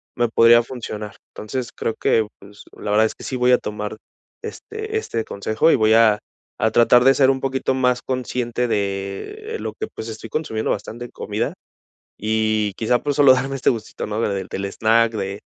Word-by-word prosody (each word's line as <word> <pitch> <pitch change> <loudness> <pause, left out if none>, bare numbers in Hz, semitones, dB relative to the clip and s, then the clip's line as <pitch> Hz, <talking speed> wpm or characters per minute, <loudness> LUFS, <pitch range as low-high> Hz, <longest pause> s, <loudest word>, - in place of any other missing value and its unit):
me 120 -1 +1
podría 115 +1 +6
funcionar. 110 -4 -7 0.2
Entonces 120 +3 -4
creo 115 - -2
que, 110 -2 +2
pues, 100 +1 -15
la - - -5
verdad 110 +1 +4
es 110 - -2
que - - -13
sí 130 - -4
voy 125 0 +3
a 125 - +5
tomar 105 0 -5 0.4
este 435 0 -5
este 115 - -2
consejo 110 +8 +1
y - - +5
voy 110 -2 +3
a 110 -2 +5 0.4
a 110 - +3
tratar 120 +1 +5
de 135 - +7
ser 135 -1 +4
un 135 0 +2
poquito 130 0 0
más 125 -1 +1
consciente 125 -1 -2
de 100 - -3
lo - - -3
que, 435 - -2
pues, 110 - -8
estoy 110 0 -8
consumiendo 110 -6 -2
bastante 120 +2 -5
comida - - -3 0.7
y 110 -1 0
quizá, 120 +3 +1
pues, 145 -1 -1
solo 140 -3 +7
darme 135 +2 -2
este 135 - 0
gustito, 115 -3 -4
¿no? 105 +1 -3
Del 100 -4 -1
del 95 - -4
snack 115 +3 +2
de 100 -1 -4
115 Hz, 190 wpm, -21 LUFS, 110-130 Hz, 0.7 s, de